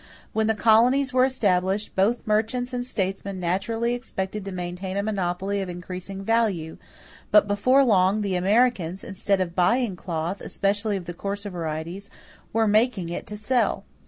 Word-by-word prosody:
When 220 Hz, 0 st, +1 dB
the 220 Hz, -, +2 dB
colonies 245 Hz, +6 st, +4 dB
were 255 Hz, 0 st, +5 dB
established, 200 Hz, -5 st, 0 dB
both 215 Hz, +6 st, +1 dB
merchants 225 Hz, +4 st, 0 dB
and 245 Hz, 0 st, -1 dB
statesmen 195 Hz, -4 st, -3 dB
naturally 210 Hz, +7 st, -1 dB
expected 210 Hz, -4 st, -4 dB
to 195 Hz, -, -5 dB
maintain 180 Hz, +1 st, -4 dB
a 200 Hz, -, 0 dB
monopoly 195 Hz, -1 st, -1 dB
of 190 Hz, -, -4 dB
increasing 185 Hz, +2 st, -7 dB
value; 200 Hz, -8 st, 0 dB, 0.5 s
but 315 Hz, -, +5 dB
before 255 Hz, +7 st, +4 dB
long 200 Hz, -2 st, +3 dB
the 200 Hz, -2 st, -1 dB
Americans, 195 Hz, -2 st, +1 dB
instead 195 Hz, 0 st, -1 dB
of 180 Hz, -2 st, -2 dB
buying 205 Hz, +4 st, +2 dB
cloth, 170 Hz, +1 st, -4 dB
especially 205 Hz, +1 st, 0 dB
of 180 Hz, -, -7 dB
the 175 Hz, -, -6 dB
coarser 200 Hz, +3 st, -4 dB
varieties, 170 Hz, +3 st, -5 dB, 0.4 s
were 225 Hz, 0 st, +2 dB
making 215 Hz, -4 st, +2 dB
it 175 Hz, -, -5 dB
to 210 Hz, -, -6 dB
sell. 240 Hz, +4 st, 0 dB
200 Hz, 160 wpm, -25 LUFS, 185-225 Hz, 0.5 s, were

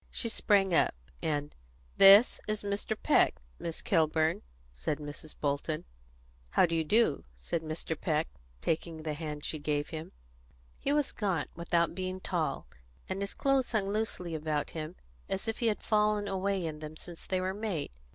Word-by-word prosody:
She 230 Hz, -, -2 dB
sprang 200 Hz, -4 st, +3 dB
up, 160 Hz, -, +4 dB, 0.3 s
and, 145 Hz, -1 st, -1 dB, 0.4 s
"This 200 Hz, +4 st, +8 dB
is 215 Hz, -1 st, -1 dB
Mr. 205 Hz, +2 st, -1 dB
Peck, -, -, +4 dB, 0.2 s
Miss 165 Hz, -1 st, -4 dB
Kilburn," 160 Hz, -2 st, +2 dB, 0.3 s
said 65 Hz, -, -2 dB
Mrs. 150 Hz, +1 st, -8 dB
Bolton. 145 Hz, +2 st, -1 dB, 0.6 s
"How -, -, +5 dB
do 165 Hz, -, -3 dB
you 165 Hz, -1 st, +2 dB
do?" 210 Hz, -1 st, +3 dB
said 110 Hz, -, -3 dB
Mr. 160 Hz, +1 st, -3 dB
Peck, 155 Hz, 0 st, 0 dB, 0.3 s
taking 160 Hz, 0 st, -2 dB
the 155 Hz, -1 st, -2 dB
hand 150 Hz, -1 st, -5 dB
she 155 Hz, -, -2 dB
gave 145 Hz, 0 st, -1 dB
him. 160 Hz, -1 st, -6 dB, 0.7 s
He 280 Hz, -, 0 dB
was 295 Hz, -1 st, +2 dB
gaunt, 190 Hz, -8 st, -1 dB
without 170 Hz, 0 st, +1 dB
being 185 Hz, +1 st, -3 dB
tall, 165 Hz, -6 st, -1 dB, 0.4 s
and 195 Hz, -, -3 dB
his 200 Hz, -, -3 dB
clothes 275 Hz, -3 st, +1 dB
hung 200 Hz, -3 st, +1 dB
loosely 210 Hz, -6 st, -1 dB
about 155 Hz, -1 st, -1 dB
him, 160 Hz, +2 st, -5 dB, 0.3 s
as 195 Hz, +3 st, -2 dB
if 225 Hz, -, -2 dB
he 235 Hz, -, +2 dB
had 215 Hz, -, 0 dB
fallen 210 Hz, -1 st, +2 dB
away 195 Hz, -1 st, 0 dB
in 155 Hz, -2 st, -4 dB
them 155 Hz, 0 st, -8 dB
since 170 Hz, 0 st, -4 dB
they 185 Hz, -, +1 dB
were 185 Hz, +1 st, -1 dB
made. 200 Hz, -, -3 dB
170 Hz, 170 wpm, -31 LUFS, 155-200 Hz, 0.7 s, This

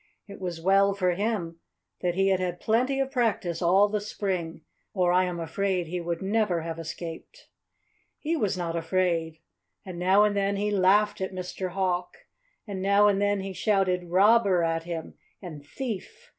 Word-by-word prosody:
It 200 Hz, -, -11 dB
was 175 Hz, -3 st, -4 dB
well 195 Hz, +3 st, +3 dB
for 185 Hz, -2 st, +1 dB
him 175 Hz, -4 st, -2 dB, 0.4 s
that 175 Hz, -1 st, 0 dB
he 195 Hz, +1 st, +2 dB
had 190 Hz, -1 st, +2 dB
had 180 Hz, -1 st, -3 dB
plenty 255 Hz, +5 st, +1 dB
of 270 Hz, 0 st, -1 dB
practice 220 Hz, -, -1 dB
all 190 Hz, +4 st, +4 dB
the 210 Hz, 0 st, -2 dB
spring, 185 Hz, -6 st, -3 dB, 0.3 s
or 180 Hz, -2 st, +2 dB
I 185 Hz, +1 st, +4 dB
am 175 Hz, -1 st, -4 dB
afraid 185 Hz, +2 st, -1 dB
he 175 Hz, +2 st, -4 dB
would 170 Hz, +2 st, -3 dB
never 200 Hz, -4 st, +1 dB
have 165 Hz, 0 st, -5 dB
escaped. 165 Hz, -, -8 dB, 0.7 s
He 320 Hz, +2 st, -2 dB
was 205 Hz, -, -1 dB
not 170 Hz, -2 st, -3 dB
afraid. 165 Hz, -1 st, 0 dB, 0.5 s
And 180 Hz, -2 st, -7 dB
now 190 Hz, +3 st, +4 dB
and 210 Hz, -1 st, +2 dB
then 200 Hz, 0 st, 0 dB
he 205 Hz, +1 st, -1 dB
laughed 205 Hz, +1 st, +3 dB
at 190 Hz, 0 st, -3 dB
Mr. 185 Hz, 0 st, -4 dB
Hawk. 180 Hz, -2 st, -1 dB, 0.5 s
And 200 Hz, -4 st, -5 dB
now 200 Hz, +2 st, +4 dB
and 200 Hz, -1 st, +2 dB
then 205 Hz, -1 st, +1 dB
he 195 Hz, 0 st, -5 dB
shouted 185 Hz, -3 st, +1 dB
"Robber!" 195 Hz, -1 st, +4 dB
at 165 Hz, 0 st, -1 dB
him, 165 Hz, -2 st, -5 dB, 0.3 s
and 160 Hz, -6 st, -9 dB
"Thief!" 250 Hz, -, -7 dB
190 Hz, 175 wpm, -27 LUFS, 175-205 Hz, 0.7 s, all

